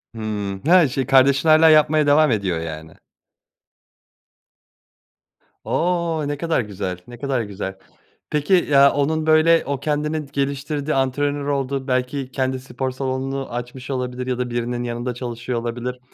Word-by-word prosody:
Hımm, 105 -3 -4
ha, 175 -1 +6
şey, 130 0 -2
kardeşin 135 +3 +4
hâlâ 155 +1 +7
yapmaya 155 -1 +4
devam 150 0 +5
ediyor, 95 -6 0
yani. 80 -1 -7 2.7
O! 170 -2 0
Ne 145 0 -3
kadar 165 -2 0
güzel, 100 -4 -5
ne 120 0 -10
kadar 135 -1 -1
güzel. 100 -2 -6 0.5
Peki, 150 +5 0 0.2
ya, 140 0 +7
onun, 155 +2 0
böyle, 160 +1 +4
o 140 -1 -2
kendini 150 +1 -2
geliştirdi, 140 +2 -2
antrenör 145 +2 0
oldu, 135 -1 -2
belki 130 +1 -2
kendi 130 -1 -1
spor 130 0 -4
salonunu 135 0 -4
açmış 125 +2 -6
olabilir 125 -1 -3
ya 125 -1 -1
da 125 0 -2
birinin 120 0 -2
yanında 120 +1 -3
çalışıyor 120 0 -4
olabilir. 120 +2 -4
130 Hz, 140 wpm, -21 LUFS, 120-145 Hz, 2.7 s, hâlâ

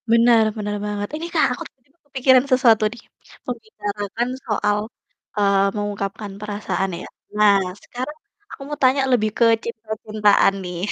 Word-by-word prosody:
Bener, 230 0 +5
bener 210 -1 -3
banget. 205 0 -3
Ini 320 +2 -5
Kak, 320 - +4
aku - - -6
tiba-tiba 275 +5 -39
kepikiran 260 -1 +4
sesuatu 240 -4 +5
nih, 240 - -11 0.5
membicarakan 220 -1 -4 0.2
soal, 210 -2 +1 0.6
eee, 200 -1 +3
mengungkapkan 205 0 -4
perasaan 205 -2 -2
ya. - - -8 0.3
Nah, 210 -1 +6 0.3
sekarang 255 +5 -6 0.3
aku - - -10
mau 295 0 -5
tanya 260 +2 +4
lebih 215 -4 +3
ke 235 - +5 0.2
cinta-cintaan 215 -3 +1
nih. 180 -1 -5
220 Hz, 135 wpm, -21 LUFS, 205-250 Hz, 0.6 s, Nah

